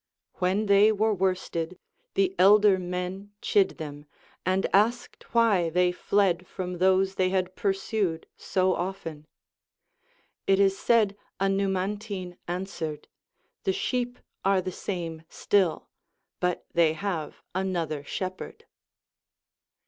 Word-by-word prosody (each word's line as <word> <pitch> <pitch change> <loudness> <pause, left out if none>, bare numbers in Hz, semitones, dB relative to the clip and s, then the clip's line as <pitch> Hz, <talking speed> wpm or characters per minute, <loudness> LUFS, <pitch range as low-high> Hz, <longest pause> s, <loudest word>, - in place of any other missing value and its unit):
ΛVhen 190 +4 +1
tliey 200 +1 +6
were 215 +1 +2
worsted, 185 -2 -1 0.4
the 195 -1 +2
elder 200 0 +6
men 180 +2 -4
chid 200 -2 +2
them, 150 -2 -8 0.4
and 185 +1 +2
asked 225 +5 +1
why 210 -8 +3
they 180 +2 +3
fled 180 -1 +1
from 180 -1 -5
those 190 +1 +3
they 185 -1 +1
had 185 -1 -1
pursued 195 -3 -1
so 185 0 +1
often. 170 -4 -5 1.2
It 195 0 +4
is 195 -1 +4
said 215 -2 +3 0.2
a 195 - +2
Numantine 195 -1 -2
answered, 170 -4 -4 0.5
The 385 - +1
sheep 250 - -2 0.3
are 195 0 +3
the 185 0 -3
same 170 -4 -5
still, 190 -5 +1 0.5
but 180 -1 -1
they 165 -2 +4
have 165 -4 -4
another 175 -6 -2
shep 185 +5 -4
herd. 455 - -9
190 Hz, 120 wpm, -27 LUFS, 180-200 Hz, 1.2 s, tliey